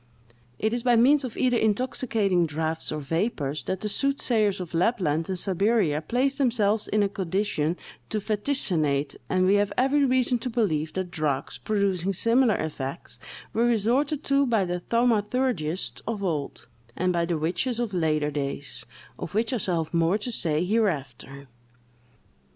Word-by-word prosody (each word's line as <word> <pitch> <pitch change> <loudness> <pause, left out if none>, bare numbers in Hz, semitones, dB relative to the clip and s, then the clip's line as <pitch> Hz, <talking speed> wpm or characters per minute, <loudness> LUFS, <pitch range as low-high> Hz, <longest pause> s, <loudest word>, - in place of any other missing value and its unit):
It 220 +1 0
is 240 - -1
by 245 0 +3
means 270 +5 +5
of 250 -3 -6
either 250 -2 +2
intoxicating 215 -5 +1
draughts 160 +1 -2
or 155 - -3
vapors 150 - -2
that 190 0 -3
the 215 - -2
soothsayers 220 -4 +1
of 175 -2 -7
Lapland 165 -4 +1
and 190 - -1
Siberia 190 -4 +1
place 260 - 0
themselves 220 -5 +2
in 210 0 +2
a - - +2
condition 190 -4 -1 0.3
to 215 - -1
vaticinate; 180 - 0
and 185 0 +2
we 190 - +4
have 205 - -1
every 270 +3 +3
reason 255 -2 +2
to 250 - -4
believe 160 -10 0
that 185 -2 -3
drugs, 150 -5 -2
producing 195 -3 0
similar 230 +4 +3
effects, 145 -1 -5 0.3
were 230 +2 +2
resorted 245 +6 +1
to 275 0 +2
by 220 -5 +2
the 180 0 -2
thaumaturgists 225 -5 0
of 215 -3 -3
old, 155 -7 -3 0.3
and 180 +1 0
by 170 -1 +1
the 170 -1 -1
witches 180 +10 -1
of 235 -4 -2
later 155 -4 +1
days, 140 -1 -5 0.4
of - - -6
which 225 +3 +1
I - - +1
shall 175 -6 0
have 155 - -15
more 170 +3 +2
to 220 +4 -4
say 165 -6 0
hereafter. 140 - -2
200 Hz, 160 wpm, -26 LUFS, 165-235 Hz, 0.4 s, means